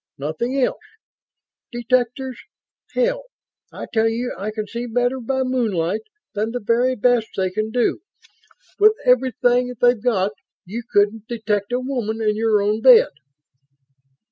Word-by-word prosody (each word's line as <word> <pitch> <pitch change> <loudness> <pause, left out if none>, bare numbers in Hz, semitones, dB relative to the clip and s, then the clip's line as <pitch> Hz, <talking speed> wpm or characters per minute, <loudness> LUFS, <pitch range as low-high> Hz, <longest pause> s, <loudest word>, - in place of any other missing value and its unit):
Nothing 195 - -2
else. 255 - 0 0.9
Detectors 250 +1 -1 0.6
hell! - - 0 0.5
I - - -7
tell 225 -1 +3
you 240 +2 -3
I 200 +3 -4
can 215 0 -4
see 235 +3 -5
better 245 +2 0
by 265 +2 -1
moonlight 215 -7 -1 0.3
than 215 +1 -1
the 245 +2 -3
very 240 +3 +1
best 240 0 +2
they 185 -1 0
can 215 +3 -2
do. 245 +7 0 0.8
With 425 +1 +6
everything 250 0 +2
they've 245 -3 +3
got 205 -5 +1 0.3
you 215 +7 -5
couldn't 205 +2 +1
detect 215 -3 -2
a 245 - +1
woman 245 -4 -3
in 215 -1 +1
your 215 -2 +2
own 210 +2 0
bed!" 250 -1 +7
235 Hz, 140 wpm, -21 LUFS, 215-250 Hz, 0.9 s, bed